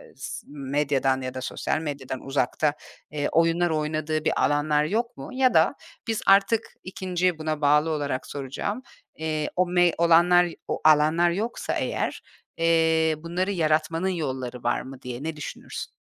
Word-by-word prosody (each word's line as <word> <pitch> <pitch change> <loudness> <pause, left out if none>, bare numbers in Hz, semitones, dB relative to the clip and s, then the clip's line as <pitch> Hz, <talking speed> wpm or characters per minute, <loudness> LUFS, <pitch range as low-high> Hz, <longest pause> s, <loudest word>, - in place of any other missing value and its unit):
s - - -7
medyadan 140 -1 0
ya 130 0 -4
da 130 - -5
sosyal 145 - -2
medyadan 140 -4 -5
uzakta, 140 +2 0 0.4
eee, 145 -1 -1
oyunlar 165 +1 +3
oynadığı 155 0 -1
bir - - +1
alanlar 150 0 +2
yok 225 +9 -2
mu 135 - -8
ya 255 0 +3
da - - +4 0.3
biz 225 -1 -1
artık 195 +3 +4
2.'yi 180 -2 -1
buna 155 -1 -2
bağlı 150 +2 +4
olarak 145 -4 -2
soracağım, 145 - -4 0.4
eee, 155 -1 -2
o 180 0 +2
me 175 -1 +3
olanlar 175 +1 +5 0.2
o - - -3
alanlar 155 +3 +5
yoksa 210 +7 -2
eğer, - - -2 0.4
eee, 160 -1 +3
bunları 175 +5 -2
yaratmanın 165 0 +1
yolları 130 -8 -4
var 120 - +1
mı 135 -1 -10
diye 125 +1 -6
ne 160 0 -3
düşünürsün? 150 - -7
155 Hz, 150 wpm, -25 LUFS, 145-175 Hz, 0.4 s, olanlar